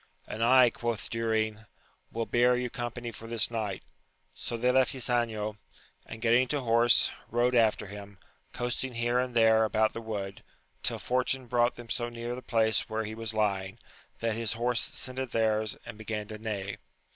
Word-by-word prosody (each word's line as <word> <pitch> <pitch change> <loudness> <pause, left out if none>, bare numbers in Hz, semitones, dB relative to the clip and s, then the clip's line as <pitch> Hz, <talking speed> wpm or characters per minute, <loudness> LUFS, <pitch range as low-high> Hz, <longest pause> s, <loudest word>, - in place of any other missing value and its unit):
And 110 - -3
I, 125 0 +6
quoth 115 -2 -3
Durin, 110 -2 -1 0.4
will 115 0 -2
bear 125 +2 +4
you 125 -1 -2
company 120 0 -4
for 115 +1 -10
this 115 0 +1
night. 105 -5 -3 0.5
So 120 - -5
they 125 +2 +3
left 130 0 +3
Ysanjo, 115 -4 -1 0.5
and 115 +1 -8
getting 120 +2 +4
to 145 +2 -1
horse, 115 0 +4 0.2
rode 120 +2 +2
after 115 -4 +3
him, 100 0 -10 0.3
coasting 125 +1 -2
here 120 +1 +1
and 125 -1 -2
there 110 -1 +5
about 110 0 +2
the 115 - -5
wood, 100 -3 -5 0.4
till - - -1
fortune 130 +1 0
brought 120 0 +2
them 120 -2 -10
so 120 -1 -1
near 120 0 -5
the 125 - -6
place 110 -2 +2
where 110 0 -1
he 110 - -5
was 115 0 -5
lying, 100 -3 0 0.4
that 115 -1 +1
his 115 0 -2
horse 120 +1 +1
scented 130 -1 -5
theirs, 110 -1 +1
and 110 - -9
began 110 -1 -4
to 110 -1 -7
neigh. 105 -3 -4
115 Hz, 175 wpm, -29 LUFS, 110-120 Hz, 0.5 s, I